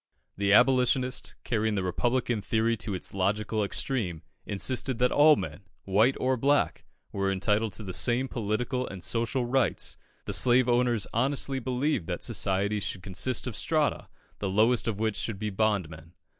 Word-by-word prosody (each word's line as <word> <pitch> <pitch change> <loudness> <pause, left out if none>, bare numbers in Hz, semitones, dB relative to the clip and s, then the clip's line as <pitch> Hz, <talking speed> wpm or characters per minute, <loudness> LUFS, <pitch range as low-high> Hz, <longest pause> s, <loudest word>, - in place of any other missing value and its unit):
The 100 0 0
Abolitionist, 125 +2 +3
carrying 110 -2 0
the 95 - -1
Republican 120 +4 0
theory 115 +2 +1
to 105 -2 -3
its 90 - -4
logical 105 +3 0
extreme, 100 - -1 0.2
insisted 125 +5 -1
that 125 +1 +2
all 150 +1 +6
men, 95 - -5 0.2
white 110 +7 +3
or 130 0 +1
black, 140 +4 +1 0.3
were 100 -1 -1
entitled 105 +2 0
to 110 - -4
the 95 -2 -6
same 120 +6 +2
political 120 +3 -2
and 95 -3 -8
social 120 +2 0
rights; 130 +1 0 0.3
the - - -3
slave 125 0 +4
owners 120 -3 +2
honestly 135 +2 0
believed 130 - -1
that - - -4
society 100 +2 0
should 95 -2 -4
consist 100 +7 -1
of 125 -4 -5
strata, 155 +6 0 0.3
the 100 - -2
lowest 110 +5 +2
of 105 -3 -2
which 110 -1 0
should 110 -4 -3
be 105 +1 -3
bondmen. 90 -6 -2
115 Hz, 160 wpm, -28 LUFS, 100-125 Hz, 0.3 s, all